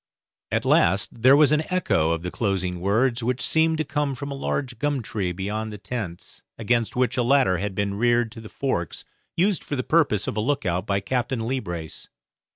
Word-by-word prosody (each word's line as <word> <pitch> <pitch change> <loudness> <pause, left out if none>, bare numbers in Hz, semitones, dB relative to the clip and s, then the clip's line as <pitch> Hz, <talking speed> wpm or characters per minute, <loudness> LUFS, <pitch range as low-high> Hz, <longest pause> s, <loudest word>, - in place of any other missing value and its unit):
At - - 0
last 95 +5 +2
there 130 +4 +7
was 150 -1 +5
an 150 0 +3
echo 180 - +2
of 85 0 -1
the 90 - -4
closing 95 -4 -1
words 115 +6 +1
which 125 +2 -1
seemed 160 +4 +2
to 155 - 0
come 145 -2 -1
from 140 +2 -6
a - - -2
large 135 -2 -3
gum 145 -4 0
tree 100 -5 -2
beyond 105 +4 -4
the 105 - -7
tents, 100 -5 -6 0.2
against 115 0 0
which 125 0 +1
a - - +3
ladder 120 -7 +3
had 100 -1 -3
been 100 0 -1
reared 120 +2 +2
to 115 0 -10
the 110 - -10
forks, 85 - -3 0.3
used 190 +2 +2
for 145 - -4
the 130 - -2
purpose 145 - +2
of - - -3
a 105 - 0
look 140 0 -1
out 90 +3 -1
by 100 0 0
Captain 125 +2 -1
Leebrace. 85 -11 -4
115 Hz, 205 wpm, -24 LUFS, 100-135 Hz, 0.3 s, there